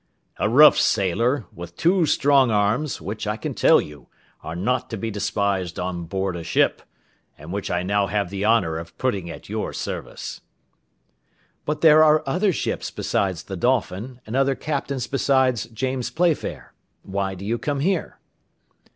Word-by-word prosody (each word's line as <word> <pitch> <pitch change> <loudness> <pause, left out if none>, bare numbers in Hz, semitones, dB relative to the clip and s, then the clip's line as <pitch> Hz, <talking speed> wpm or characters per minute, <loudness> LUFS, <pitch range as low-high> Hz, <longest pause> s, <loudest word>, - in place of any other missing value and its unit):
"A - - 0
rough 150 +6 +7
sailor, 115 +7 +1
with 85 0 -10
two 175 -1 +3
strong 140 -2 +4
arms, 110 +7 0
which, 105 +5 -5
I 105 +1 -1
can - - -4
tell - - +5
you, 75 -4 -8 0.3
are 80 - -6
not 120 +8 -1
to 115 - -4
be 115 +2 -3
despised 100 -3 -1
on 90 -1 -3
board 95 +1 -2
a 85 - -5
ship, - - +1 0.6
and 75 +5 -9
which 100 0 -3
I 90 0 -1
now 100 +1 +1
have 100 -1 -1
the 100 0 -3
honour 95 -8 +2
of 85 0 -11
putting 100 -9 -1
at 80 - -9
your - - -3
service." - - -6 1.2
"But 150 0 -2
there 155 -1 +7
are 155 0 +4
other 185 +9 +1
ships 155 - -3
besides 95 -4 -1
the 95 - -6
Dolphin, 120 +2 -1
and 110 - -5
other 135 0 +2
captains 140 -4 -3
besides 130 -3 +1
James 130 +2 -3
Playfair. 170 -2 -1 0.3
Why 95 0 -3
do 95 +2 -8
you 115 +3 -1
come 145 -2 -2
here?" 185 +2 -1
110 Hz, 165 wpm, -23 LUFS, 95-135 Hz, 1.2 s, rough